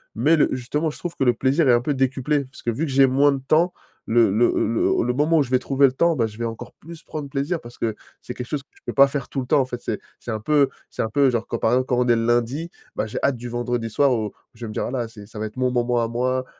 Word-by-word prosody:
mais 145 +9 +4
le 150 - +4
justement, 145 +5 -2
je - - -12
trouve 175 -1 -5
que 135 - 0
le 125 - +4
plaisir 135 +6 +2
est 125 - +6
un 120 - +3
peu 145 +3 -1
décuplé 135 +2 0
parce 130 - -15
que, - - -2
vu 130 +8 -1
que 140 - -4
j'ai 135 0 +5
moins 140 +3 +4
de 135 -1 -3
temps, 170 +3 +3 0.3
le 115 -1 +4
le 110 +5 +3
le 115 - +1
le 125 +1 0
moment 150 +5 +2
où - - +4
je 125 - -9
vais 130 - +4
trouver 135 +2 +3
le - - -1
temps, 170 +5 +2
bah, 115 -5 +1
je 110 0 -12
vais 115 - -2
encore 115 -1 -6
plus 165 +1 -12
prendre 150 -3 -6
plaisir, 145 +5 -2
parce 120 0 -13
que 110 -2 -1 0.3
c'est 125 - -7
quelque 125 - -5
chose 145 +2 -3
que 140 - -31
je - - -23
peux - - -4
pas 140 0 +7
faire 140 -2 -4
tout 135 - -4
le 125 - -7
temps. 150 0 +4
En - - 0
fait, 125 -1 -7
c'est - - -3 0.2
c'est - - -10
un 110 -2 -2
peu 140 +4 +3 0.2
c'est - - -3
un 110 - -1
peu 140 +3 +3
genre, 115 -1 -2
quand, 115 - -2
par 110 - +1
exemple, 130 +1 +2
quand 125 - +1
on 125 - +2
est 120 - +5
le 115 0 0
lundi, 120 +8 0 0.3
bah, 110 - -1
j'ai 110 - -6
hâte 140 -2 +2
du 120 +1 -7
vendredi 120 -1 -2
soir 135 +4 +3
où 110 -3 -1
où - - -9 0.2
je 115 +1 -8
vais - - -5
me 105 - -7
dire: - - -2
«Ah - - -4
là, 125 -3 -2
c'est 105 -2 -12
ça 110 +1 -10
va 110 - -2
être 105 - -14
mon 125 -1 +1
moment 120 -1 +1
à - - 0
moi, 130 +2 -1
125 Hz, 330 wpm, -23 LUFS, 120-140 Hz, 0.3 s, pas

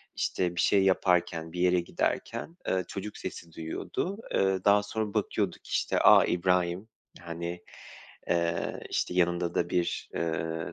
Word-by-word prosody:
işte, 90 -1 -1
bir - - +1
şey 100 -1 +4
yaparken, 90 -3 +1
bir 90 - -5
yere 90 0 +4
giderken, 165 - -3
ııı, 95 -1 +1
çocuk 105 +1 -6
sesi 85 -1 -7
duyuyordu. 170 - -4 0.2
Iıı, 95 -1 +1
daha 105 0 +5
sonra 105 0 -3
bakıyordu - - 0
ki, - - -15
işte, - - +1
a, - - +7
İbrahim. 90 +3 0 0.3
Hani, 85 +1 -5 0.7
eee, 85 -1 0
işte, 90 - -1
yanında 85 -1 +1
da - - 0
bir, 85 -1 -1
ııı, 80 0 -2
90 Hz, 145 wpm, -29 LUFS, 85-95 Hz, 0.7 s, a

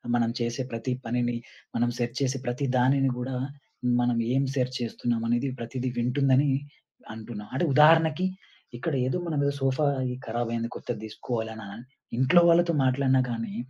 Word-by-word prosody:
మనం 115 -1 +2
చేసే 120 +2 -1
ప్రతి 115 +2 -3
పనిని, 120 +1 0 0.4
మనం 120 +1 +2
సెర్చ్ 120 +1 -2
చేసే 135 0 +1
ప్రతి 125 +3 -1
దానిని 135 +2 +3
గూడా 130 +1 -3 0.7
మనం 120 -1 +1 0.2
ఏం 135 +1 +3
సెర్చ్ 130 -1 0
చేస్తున్నామనేది 120 +2 -1
ప్రతీదీ 125 +2 -3
వింటుందని 135 +3 +3 0.6
అంటున్నా. 110 -1 -8
అంటే 135 +7 +1
ఉదాహరణకి 160 +3 +5 0.5
ఇక్కడ 155 +6 -2
ఏదో 130 - 0
మనం 155 -3 -1
ఏదో 140 - +1
సోఫా 135 +2 +1 0.3
ఈ - - -5
కరాబయింది. 115 0 -2
కొత్తది - - -5
తీసుకోవాలి 110 +1 -4
అననన్ 110 +1 -9 0.3
ఇంట్లో 145 +8 +5
వాళ్ళతో 170 0 +4
మాట్లాడినా 130 0 +3
గానీ 115 -3 -4
125 Hz, 145 wpm, -27 LUFS, 115-135 Hz, 0.7 s, ఉదాహరణకి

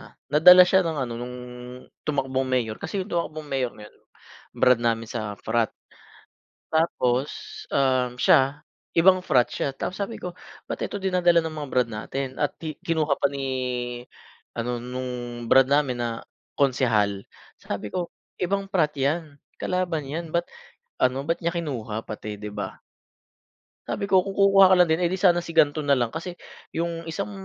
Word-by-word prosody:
ah, - - -15 0.2
nadala 180 +4 +9
siya 190 +1 +4
ng 165 -4 -2
ano 120 - -6
nung 125 +1 -6 0.7
tumakbong 135 -2 0
mayor 120 -4 -1
kasi 195 -2 -3
yung - - -12
tumakbong 155 -2 -2
mayor 135 -4 -1
na 105 - -11
yun, - - -16 0.6
brad 125 -2 +4
namin 115 -1 0
sa 110 -3 -5
frat. 115 0 +1 1.0
Tapos, 140 -4 +1 0.4
um, 130 -2 +1
siya 140 +4 +3 0.3
ibang 185 +2 +6
frat 125 -8 +3
siya, 120 +3 -2
tapos 185 +8 -4
sabi 225 +3 -5
ko 180 -1 -6 0.3
ba't - - -5
ito 205 - -3
dinadala 180 -3 +3
ng 155 - -5
mga 145 - -7
brad 125 -2 +2
natin 130 +4 -5
at 145 - -1
ki 155 -2 -5
kinuha 155 -3 +1
pa 140 - 0
ni 140 -1 -4 1.1
ano 120 0 -2
nung 125 +1 -5 0.4
brad 135 +2 +5
namin 135 -4 +2
na 120 - -1 0.5
konsehal, 115 -8 +2 0.4
sabi 100 +1 -4
ko 175 -1 -2 0.3
ibang 195 +2 0
frat 175 -7 +1
yan, 145 +1 -1 0.2
kalaban 175 -6 -1
yan 165 +2 -5
ba't 170 - +3 0.6
ano, 130 +2 +1
ba't 165 +4 -1
niya 170 +1 -2
kinuha 120 -10 -3
pati, 105 -1 -6
di 105 0 -7
ba? 105 - -6 1.1
Sabi 200 - -2
ko 190 -2 +4
kung 195 +1 -6
kukuha 195 -1 +7
ka - - +7
lang 180 - +6
din, 160 +3 +1
eh, 170 - +2
di 185 - -2
sana 175 -2 +4
si - - -8
gan'to 155 -2 +3
nalang 135 -3 +1
kasi, 175 +2 -6 0.3
yung 170 0 -3
isang 195 +5 -4
145 Hz, 165 wpm, -25 LUFS, 125-175 Hz, 1.1 s, nadala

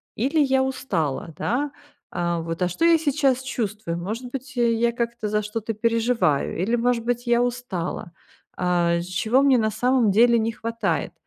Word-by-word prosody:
или 280 +8 0
я 265 -2 +3
устала?" 175 - -2
Да? 280 +5 -1 0.4
А, 170 -1 -1
вот: 165 +2 -3
"А 180 - +2
что 330 - 0
я 335 -1 +6
сейчас 275 -4 +1
чувствую? 215 -8 -3
Может 230 +7 -5
быть, 265 0 -7
э, 235 -1 +3
я 235 +1 +2
как-то 235 -1 -3
за 210 0 0
что-то 220 +1 -4
переживаю? 230 - +1
Или, 220 +6 +1
может 240 -1 0
быть, 245 0 -2
я 240 0 +3
устала? 235 -9 -4 0.5
А, 175 -1 +1
чего 220 +9 +1
мне 265 -3 +5
на 220 - +1
самом 240 +1 +2
деле 235 +3 +5
не 225 +1 -1
хватает?" 230 +1 -2
230 Hz, 170 wpm, -23 LUFS, 195-250 Hz, 0.5 s, я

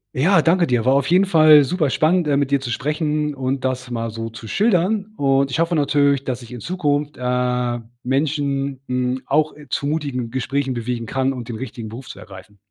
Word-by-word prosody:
Ja, 165 +6 +4
danke 170 +2 +3
dir. 125 -2 0
War 130 - +4
auf 140 -1 +2
jeden 185 +3 +4
Fall 155 -5 +7
superspannend, 160 +2 +1
äh, 140 - +2
mit 140 -2 0
dir 140 -1 +2
zu 120 -3 -4
sprechen 150 +2 -1
und 130 0 -2
das 130 -1 -3
mal 115 -1 -3
so 115 0 -6
schildern. 195 - 0
Und 135 -1 +2
ich 155 - -2
hoffe 170 +1 +1
natürlich, 140 -2 +2
dass 130 -2 -4
ich 120 - -12
in 120 - -8
Zukunft, 150 -5 -1
äh, 125 -1 -1 0.2
Menschen, 140 0 -1
hm, 125 0 -1
auch, 155 +2 +1
äh, 150 -1 -15
zu 140 - -2
mutigen 140 -6 -2
Gesprächen 135 +1 -1
bewegen 120 0 -3
kann, 135 +2 0
um 125 -2 -6
den 115 -1 -7
richtigen 115 -3 -7
Beruf 120 +4 -9
zu - - -10
ergreifen. 100 +1 -13
135 Hz, 200 wpm, -20 LUFS, 125-150 Hz, 0.2 s, Fall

